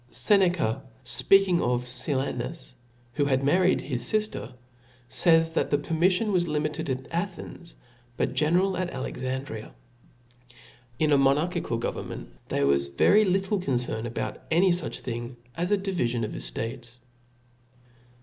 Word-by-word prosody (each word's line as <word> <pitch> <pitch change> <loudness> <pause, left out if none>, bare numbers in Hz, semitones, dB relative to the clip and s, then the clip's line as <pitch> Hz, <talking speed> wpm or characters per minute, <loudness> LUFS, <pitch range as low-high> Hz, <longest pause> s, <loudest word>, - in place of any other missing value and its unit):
/ - - -33
' - - -31 0.2
Seneca*, 180 - +3 0.2
fpeaking 195 -3 +4
of 125 0 0
Silanus, 130 +3 -2 0.4
who 145 +1 +1
had 135 -1 +1
married 180 +6 +3
his 125 -3 -1
fifter, 215 - -1 0.6
fays, 165 +5 +4
that - - 0
the 145 - +3
permifiion 180 +8 +1
was 175 -3 +2
limited 150 0 -2
at 130 +1 -3
Athens, 175 -1 -5 0.4
but - - 0
general 175 +7 +2
at 185 -1 -1
Alexandria. 130 - -5 1.3
In 155 -1 +2
a 140 - +5
mo 135 0 +5
narchical 160 -6 -2
government - - -5 0.2
there 70 - +1
was 70 0 +3
very 200 - +4
little 195 +2 +1
concern 120 -6 -1
about 120 - -4
any 180 +3 +4
fuch 175 -1 -2
thing 120 0 -5 0.2
as 175 +2 -2
a 205 - +3
divifion 150 - -1
of 110 - -6
eftates. 120 +1 -5
150 Hz, 140 wpm, -26 LUFS, 125-180 Hz, 1.3 s, a